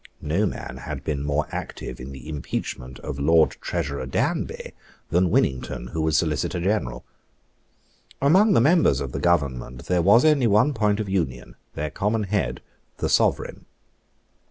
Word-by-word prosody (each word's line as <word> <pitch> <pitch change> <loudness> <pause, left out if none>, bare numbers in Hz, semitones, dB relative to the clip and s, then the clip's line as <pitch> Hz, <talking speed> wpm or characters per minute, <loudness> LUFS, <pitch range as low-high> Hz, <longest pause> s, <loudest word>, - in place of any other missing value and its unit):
No 90 +8 +1
man 65 - -6
had - - -6
been 75 -2 -2
more 75 +1 0
active - - -6
in 65 +2 -8
the 65 -3 -10
impeachment 65 -4 -5
of 70 - -5
the - - -5
Lord 80 +2 +4
Treasurer 70 -2 -3
Danby 65 - -2 0.4
than 90 +1 +3
Winnington, 65 -4 0
who 80 - -2
was 80 0 +2
Solicitor 80 0 0
General. 95 - -1 1.1
Among 190 +10 +5
the - - +5
members 155 - +4
of 70 -3 -4
the - - -4
Government 65 -7 0
there 90 -1 +1
was 105 - +5
only 145 -6 +4
one 110 +8 +4
point 105 -3 +1
of 105 - -2
union, 80 -11 -2 0.2
their 75 0 -3
common 105 +5 0
head, 90 - -2 0.3
the - - -1
Sovereign. - - +1
80 Hz, 155 wpm, -24 LUFS, 65-105 Hz, 1.1 s, Among